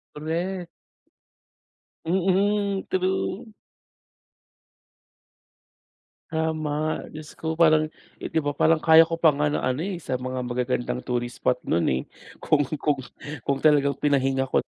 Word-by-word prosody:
Correct. 170 Hz, +4 st, -3 dB, 1.4 s
Mm, 195 Hz, +3 st, +1 dB
true. 190 Hz, +3 st, -1 dB, 2.8 s
Tama, 155 Hz, -1 st, -1 dB
Diyos 155 Hz, 0 st, -10 dB
ko 160 Hz, 0 st, -3 dB
parang, 155 Hz, -1 st, +4 dB, 0.3 s
eh, -, -, -5 dB
'di -, -, +2 dB
ba 145 Hz, -2 st, -2 dB
parang 160 Hz, +1 st, +3 dB
kaya 160 Hz, 0 st, +7 dB
ko 165 Hz, 0 st, -4 dB
pa 160 Hz, -3 st, +5 dB
nga 150 Hz, +1 st, +1 dB
ng -, -, 0 dB
ano, 130 Hz, +4 st, 0 dB
eh, 190 Hz, -3 st, -4 dB
sa 130 Hz, -, -3 dB
mga 130 Hz, 0 st, -4 dB
magagandang 125 Hz, 0 st, -2 dB
tourist 120 Hz, -1 st, -3 dB
spot 125 Hz, 0 st, +2 dB
nun, 85 Hz, +1 st, +2 dB
eh, 65 Hz, 0 st, -1 dB, 0.4 s
kung, 145 Hz, -1 st, +2 dB, 0.2 s
kung, 145 Hz, -3 st, +1 dB, 0.4 s
kung 140 Hz, -1 st, 0 dB
talagang 140 Hz, -2 st, +3 dB
pinahinga 135 Hz, -2 st, +1 dB
ko -, -, +1 dB
155 Hz, 125 wpm, -25 LUFS, 135-165 Hz, 2.8 s, kaya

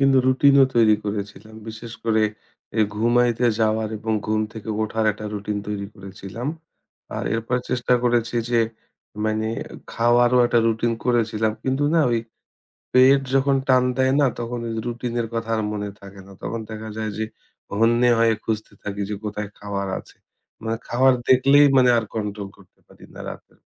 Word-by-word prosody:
কিন্তু 135 Hz, -1 st, +5 dB
রুটিন 130 Hz, +2 st, +5 dB
ও -, -, +8 dB
তৈরি 110 Hz, -2 st, +6 dB
করেছিলাম। 105 Hz, +1 st, -5 dB
বিশেষ 115 Hz, +1 st, -8 dB
করে 110 Hz, -1 st, +2 dB, 0.6 s
এ -, -, +5 dB
ঘুমাইতে 120 Hz, +2 st, +2 dB, 0.2 s
যাওয়ার 110 Hz, 0 st, +1 dB
এবং 110 Hz, +1 st, -2 dB
ঘুম 110 Hz, 0 st, +1 dB
থেকে 110 Hz, -1 st, -9 dB
ওঠার 110 Hz, +1 st, -1 dB
একটা 105 Hz, +1 st, -10 dB
রুটিন 105 Hz, 0 st, -3 dB
তৈরি 100 Hz, -1 st, -3 dB
করেছিলাম। 100 Hz, +4 st, -7 dB, 0.7 s
আর -, -, -3 dB
এরপর 115 Hz, +2 st, -1 dB
চেষ্টা 125 Hz, 0 st, +2 dB
করেছি 120 Hz, -1 st, +1 dB, 0.2 s
যে 120 Hz, -, +3 dB, 0.7 s
মানে 110 Hz, 0 st, 0 dB, 0.5 s
খাওয়ারও 120 Hz, +1 st, +4 dB
একটা 120 Hz, -, +2 dB
রুটিন 115 Hz, +1 st, +1 dB
করেছিলাম। 110 Hz, -3 st, +1 dB
কিন্তু 135 Hz, +2 st, 0 dB
না 165 Hz, -, +5 dB
ওই 120 Hz, -, +2 dB, 0.7 s
পেট 130 Hz, +2 st, +6 dB
যখন 135 Hz, 0 st, +3 dB
টান 130 Hz, -1 st, +5 dB
দেয় 130 Hz, 0 st, +2 dB
না 145 Hz, -, +4 dB
তখন 120 Hz, +1 st, -4 dB
এইযে 115 Hz, -1 st, -3 dB
রুটিন 120 Hz, 0 st, -4 dB
এর 115 Hz, -, -2 dB
কথা 115 Hz, 0 st, -3 dB
আর 110 Hz, -, -1 dB
মনে 105 Hz, -1 st, -3 dB
থাকে 100 Hz, 0 st, -12 dB
না। 100 Hz, -, -13 dB
তখন 115 Hz, -, -3 dB
দেখা 110 Hz, 0 st, -6 dB
যায় 110 Hz, -1 st, -2 dB
যে 110 Hz, -, 0 dB, 0.5 s
হন্যে 120 Hz, +2 st, +4 dB
হয়ে 115 Hz, 0 st, +4 dB
খুঁজতে 110 Hz, -1 st, -3 dB
থাকি 100 Hz, 0 st, -5 dB
যে -, -, -1 dB
কোথায় 105 Hz, 0 st, -4 dB
খাবার 100 Hz, -1 st, -4 dB
আছে। -, -, -15 dB, 0.5 s
মানে 115 Hz, 0 st, -2 dB
খাবার 130 Hz, +2 st, +4 dB
দেখলেই 140 Hz, +3 st, +6 dB
মানে 125 Hz, -1 st, +6 dB
আর 115 Hz, -, -1 dB
কন্ট্রোল 105 Hz, -2 st, -4 dB
করতে 100 Hz, -2 st, -22 dB
পারি -, -, -17 dB
না -, -, -10 dB
রাতে। -, -, -12 dB
115 Hz, 170 wpm, -23 LUFS, 110-125 Hz, 0.7 s, ও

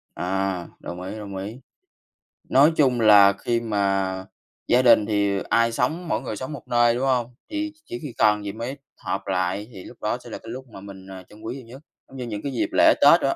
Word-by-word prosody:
À, 95 Hz, -1 st, -2 dB
đồng 90 Hz, +1 st, -7 dB
ý, 95 Hz, +4 st, -6 dB
đồng 100 Hz, -2 st, -7 dB
ý. 105 Hz, +7 st, -6 dB, 0.9 s
Nói 145 Hz, +4 st, +6 dB
chung 130 Hz, -5 st, +3 dB
là 100 Hz, -2 st, +7 dB
khi 115 Hz, +4 st, -1 dB
mà 95 Hz, -4 st, -1 dB, 0.4 s
gia 125 Hz, -, +4 dB
đình 120 Hz, -4 st, +6 dB
thì 100 Hz, -2 st, +1 dB
ai 115 Hz, +1 st, +3 dB
sống 155 Hz, +9 st, -1 dB
mỗi 110 Hz, -, -1 dB
người 120 Hz, -4 st, -5 dB
sống 130 Hz, +7 st, -6 dB
một 140 Hz, -, -10 dB
nơi, 120 Hz, 0 st, +3 dB
đúng 130 Hz, -, -2 dB
hông? 125 Hz, -2 st, 0 dB
Thì 310 Hz, 0 st, -3 dB
ch -, -, -29 dB
chỉ 180 Hz, -, -6 dB
khi 145 Hz, -6 st, -7 dB
cần 105 Hz, -1 st, +3 dB
gì 100 Hz, -, -3 dB
mới 115 Hz, +6 st, -6 dB, 0.2 s
họp 100 Hz, +1 st, -4 dB
lại 95 Hz, +2 st, -1 dB
thì 95 Hz, -, -10 dB
lúc -, -, -12 dB
đó -, -, -1 dB
sẽ -, -, -11 dB
là -, -, -6 dB
cái 115 Hz, -, -12 dB
lúc 130 Hz, +2 st, -7 dB
mà 95 Hz, -, -10 dB
mình, 95 Hz, -1 st, -11 dB
à, 95 Hz, -1 st, -9 dB
trân 105 Hz, +1 st, -16 dB
quý 115 Hz, +3 st, -5 dB
nhiều 130 Hz, -4 st, -10 dB
nhất, 130 Hz, +5 st, -12 dB, 0.3 s
giống 135 Hz, -, -12 dB
như 125 Hz, -, -4 dB
những 105 Hz, -3 st, -5 dB
cái 140 Hz, -, -3 dB
dịp 125 Hz, -, -1 dB
lễ -, -, +6 dB
Tết -, -, +7 dB
đồ -, -, +1 dB
á. -, -, 0 dB
110 Hz, 245 wpm, -24 LUFS, 100-125 Hz, 0.9 s, là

